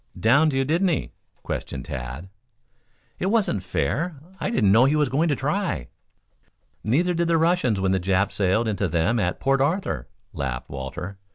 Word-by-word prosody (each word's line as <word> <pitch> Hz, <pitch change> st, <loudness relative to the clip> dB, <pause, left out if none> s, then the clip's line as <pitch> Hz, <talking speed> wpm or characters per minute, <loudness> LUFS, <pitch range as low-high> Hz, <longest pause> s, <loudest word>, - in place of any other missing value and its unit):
"Downed 140 Hz, +7 st, +4 dB
you, 135 Hz, 0 st, +1 dB
did 160 Hz, +6 st, +1 dB
he?" 160 Hz, -, -1 dB, 0.3 s
questioned 65 Hz, -3 st, -5 dB
Tad. 65 Hz, +7 st, -6 dB, 0.9 s
"It 185 Hz, -, 0 dB
wasn't 205 Hz, -, +1 dB
fair. 155 Hz, -, -1 dB, 0.2 s
I -, -, -1 dB
didn't 105 Hz, -, +3 dB
know 115 Hz, +5 st, +6 dB
he 140 Hz, +3 st, +3 dB
was 150 Hz, -3 st, +2 dB
going 150 Hz, +6 st, +1 dB
to 145 Hz, -, +2 dB
try." 140 Hz, -, -2 dB, 0.9 s
"Neither 165 Hz, +11 st, +2 dB
did 170 Hz, 0 st, 0 dB
the 165 Hz, -1 st, +3 dB
Russians 160 Hz, -, +2 dB
when 95 Hz, 0 st, +1 dB
the 95 Hz, -, +2 dB
Japs 95 Hz, +2 st, 0 dB
sailed 105 Hz, +4 st, +2 dB
into 100 Hz, -2 st, 0 dB
them 85 Hz, +8 st, +1 dB
at 90 Hz, -3 st, -1 dB
Port 135 Hz, 0 st, +2 dB
Arthur," 145 Hz, -, -1 dB, 0.3 s
laughed 65 Hz, -3 st, -4 dB
Walter. 70 Hz, +9 st, -6 dB
120 Hz, 170 wpm, -24 LUFS, -, 0.9 s, know